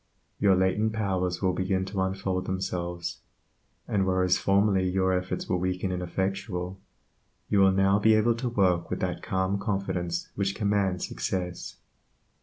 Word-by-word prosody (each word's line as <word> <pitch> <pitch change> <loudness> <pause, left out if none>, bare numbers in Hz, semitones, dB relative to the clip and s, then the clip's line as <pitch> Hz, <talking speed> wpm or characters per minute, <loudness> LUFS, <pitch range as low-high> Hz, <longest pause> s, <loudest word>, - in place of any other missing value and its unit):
Your 100 -2 +5
latent 100 +4 +1
powers 95 -4 -1
will 95 -1 +2
begin 95 0 0
to 95 0 -3
unfold 95 -1 -1
themselves, 90 -2 -3 0.7
and 100 -2 +1
whereas 95 -1 +2
formerly 95 -1 +2
your 95 0 +1
efforts 90 0 -2
were 90 - +1
weak 90 0 -2
and 95 -1 0
ineffectual, 95 +1 -3 0.7
you 100 - +3
will 95 0 +6
now 95 +1 +3
be 110 +1 +5
able 110 +2 +3
to 125 +1 -2
work 95 -6 +1
with - - -2
that - - -2
calm 95 +1 -1
confidence 95 -4 -2
which 100 0 -1
commands 100 -3 0
success. 90 -2 -4
95 Hz, 150 wpm, -27 LUFS, 90-100 Hz, 0.7 s, will